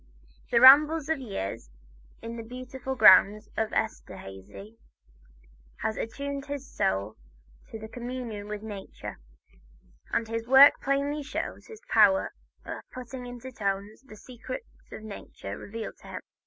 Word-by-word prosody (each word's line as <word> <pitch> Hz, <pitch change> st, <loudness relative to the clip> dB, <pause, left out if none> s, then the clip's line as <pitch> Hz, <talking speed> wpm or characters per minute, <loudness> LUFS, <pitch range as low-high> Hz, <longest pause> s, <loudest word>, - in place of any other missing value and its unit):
The 235 Hz, -, +4 dB
rambles 300 Hz, +4 st, +8 dB
of 320 Hz, -3 st, +1 dB
years 100 Hz, -, -5 dB, 0.5 s
in 230 Hz, 0 st, -6 dB
the 230 Hz, -, -6 dB
beautiful 255 Hz, +3 st, -6 dB
grounds 210 Hz, -1 st, +6 dB
of 220 Hz, 0 st, -1 dB
Esterhazy 100 Hz, -, -6 dB, 1.0 s
had 220 Hz, -, -1 dB
attuned 280 Hz, +4 st, -5 dB
his 280 Hz, -1 st, -5 dB
soul 100 Hz, +3 st, -1 dB, 0.5 s
to 220 Hz, 0 st, -8 dB
communion 240 Hz, -3 st, -6 dB
with 210 Hz, 0 st, -6 dB
nature, 205 Hz, -3 st, -8 dB, 0.9 s
and 230 Hz, -, 0 dB
this 230 Hz, +1 st, -4 dB
work 270 Hz, +3 st, +8 dB
plainly 280 Hz, +2 st, 0 dB
shows 290 Hz, -, -5 dB
his 445 Hz, -1 st, -12 dB
power 290 Hz, 0 st, +4 dB, 0.3 s
of -, -, -6 dB
putting 250 Hz, 0 st, -8 dB
into 245 Hz, +1 st, -8 dB
tones 200 Hz, -1 st, -3 dB
the 265 Hz, -5 st, -14 dB
secrets 255 Hz, -, -8 dB, 0.3 s
nature 200 Hz, -, -8 dB
revealed 220 Hz, -, -7 dB
to -, -, -16 dB
him. -, -, -7 dB
230 Hz, 130 wpm, -28 LUFS, 210-270 Hz, 1.0 s, rambles